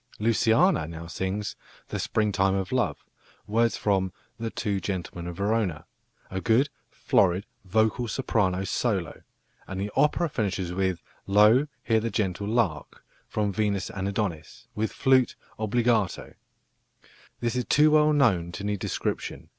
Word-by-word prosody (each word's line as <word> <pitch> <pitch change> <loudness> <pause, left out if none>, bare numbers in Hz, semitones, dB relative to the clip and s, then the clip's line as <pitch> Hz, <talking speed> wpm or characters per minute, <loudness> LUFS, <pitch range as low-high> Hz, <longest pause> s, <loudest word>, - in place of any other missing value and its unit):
Luciana 115 - +3
now 80 0 -8
sings 95 +4 -3 0.3
"The - - -3
springtime 100 -3 +1
of 95 -2 -2
love," - - -1 0.4
words 115 +2 +1
from 95 -3 +1 0.3
The 115 0 -2
Two 105 -3 -2
Gentlemen 90 -3 -4
of 85 - -5
Verona, 100 -6 0 0.5
a 95 0 -3
good 125 +8 +3 0.2
florid 95 0 +2 0.2
vocal 110 +5 +1
soprano 100 -6 0
solo; 95 -4 -1 0.5
and 95 0 -5
the 100 +1 -3
opera 160 +3 +3
finishes 100 - -2
with 95 -2 -1 0.2
"Lo, 105 +8 +5 0.2
here 115 -2 +2
the 115 +1 -2
gentle 100 -1 -1
lark," 105 -9 -1 0.2
from 105 -2 -1
Venus 100 0 -1
and 100 -3 -3
Adonis, 95 -1 -4
with 110 -1 -1
flute 130 -2 +3 0.2
obbligato. 110 -2 0 1.1
This 120 0 -1
is 125 -1 -1
too 150 +1 +4
well 155 0 +5
known 105 - +2
to 100 - -6
need 105 -1 -1
description. - - -3
105 Hz, 140 wpm, -26 LUFS, 95-115 Hz, 1.1 s, Lo